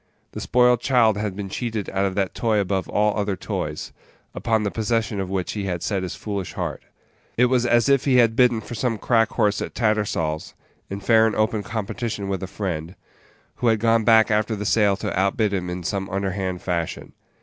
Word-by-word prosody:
The - - -6
spoiled 125 -1 +3
child 120 -5 +3
had 105 -2 -3
been 100 0 -5
cheated 110 0 -3
out 95 0 0
of 95 -1 -2
that 100 -2 -1
toy 110 -2 0
above 95 -2 -1
all 105 0 +2
other 100 -2 -1
toys, - - -4 0.4
upon 110 -2 0
the 100 - -1
possession 110 -1 -1
of 95 -1 -3
which 95 -2 -2
he 105 -2 -4
had 90 -3 -3
set 100 -3 -1
his 95 - -4
foolish 100 -4 -5
heart. - - -4 0.6
It 125 - +5
was 125 -1 +2
as 120 0 +3
if 140 -2 +3
he 135 -3 +3
had 115 -2 +4
bidden 120 -2 +4
for 120 - -9
some 115 0 -1
crack 115 0 +2
horse 105 -3 +1
at - - -5
Tattersall's, 105 -9 -1 0.3
in 100 +1 -5
fair 110 +2 +5
and 110 - -2
open 110 0 +1
competition 105 0 -4
with 95 -2 -2
a 95 - -4
friend, 90 -3 -4 0.6
who 125 - 0
had 110 -1 +4
gone 115 0 +3
back 110 -1 +5
after 110 +1 +1
the 105 0 -5
sale 105 -2 +3
to 95 - -2
outbid 100 +2 +1
him 90 -2 -2
in 90 0 -5
some 95 +2 -3
underhand 95 -1 -3
fashion. 85 -3 -3
105 Hz, 205 wpm, -23 LUFS, 95-115 Hz, 0.6 s, It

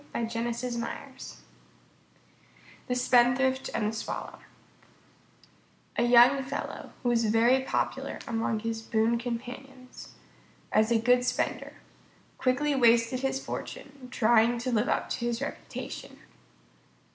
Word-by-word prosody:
_ 235 +3 -4 1.5
THE 250 - -1
SPENDTHRIFT 250 +2 +3
AND 210 - 0
THE - - -7
SWALLOW - - -5 1.6
A - - +1
young 245 +3 +6
fellow, 275 +2 -6
who 245 - +1
was 230 -1 +2
very 230 +4 +4
popular 265 - -2
among 225 -1 -1
his 225 0 -3
boon 225 +1 +1
companions 255 +2 -8 0.6
as 220 +1 +3
a 235 - +5
good 245 +2 +3
spender, 250 0 -2 0.7
quickly 285 +3 +1
wasted 235 -1 +3
his 270 0 -2
fortune 275 -2 -7
trying 235 0 +3
to 250 +2 -3
live 235 +4 +1
up - - 0
to - - -1
his 235 -1 -1
reputation. 275 - -7
240 Hz, 110 wpm, -28 LUFS, 230-260 Hz, 1.6 s, young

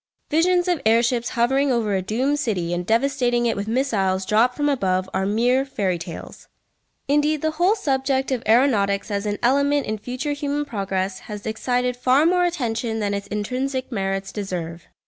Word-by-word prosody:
Visions 350 +3 +3
of 350 -4 0
air 225 +2 +4
ships 240 0 0
hovering 270 +4 +2
over 225 -4 0
a 190 - 0
doomed 255 +9 0
city 185 - -1
and 175 0 -3
devastating 245 0 +1
it 230 - +1
with 200 +1 -4
missiles 205 -7 0
dropped 230 +5 +2
from 290 0 +1
above 190 -9 0
are 190 - 0
mere 245 +5 +2
fairy 195 -10 -2
tales. 170 0 -9 0.6
Indeed 295 +1 +1
the 315 - +1
whole 350 +7 +2
subject 270 -7 0
of 255 -3 0
aeronautics 220 -4 +2
as 200 +1 -2
an 205 0 -1
element 280 +3 +2
in 215 0 -3
future 255 +6 -3
human 290 0 -2
progress 195 -5 -3
has 210 -1 -7
excited 250 +3 -1
far 255 +4 +3
more 355 +1 +3
attention 235 -9 -2
than 205 -2 -1
its 200 0 -4
intrinsic 255 +6 -3
merits 195 -2 -2
deserve. 175 -5 -5
240 Hz, 175 wpm, -22 LUFS, 200-275 Hz, 0.6 s, air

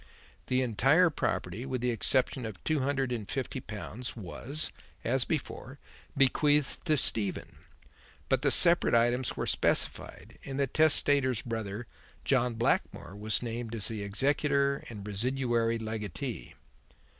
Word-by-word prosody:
The 130 0 +1
entire 135 - +4
property, 105 - -2
with 130 -2 -3
the 125 0 +1
exception 130 +2 +1
of 110 -4 -6
two 155 -1 +1
hundred 135 -1 -1
and 110 -4 -4
fifty 135 0 -3
pounds, 115 +2 -6
was, 120 - -4 0.3
as 125 +2 +1
before, 140 -3 -4 0.4
bequeathed 145 +1 +2
to 155 -3 +3
Stephen, 110 -5 0 0.7
but - - +1
the - - +3
separate 170 -7 +5
items 120 +2 +1
were - - -1
specified, - - -1
and 135 0 -5
the 140 - +3
testator's 140 -4 +3
brother, 110 -1 -4 0.4
John 125 -3 +2
Blackmore, 115 -4 -1
was 105 +3 -1
named 115 -1 -4
as 105 - 0
the 110 -2 -4
executor 140 +6 +1
and 105 -3 -8
residuary 115 +1 0
legatee." 110 -4 -5
125 Hz, 135 wpm, -30 LUFS, 110-135 Hz, 0.7 s, separate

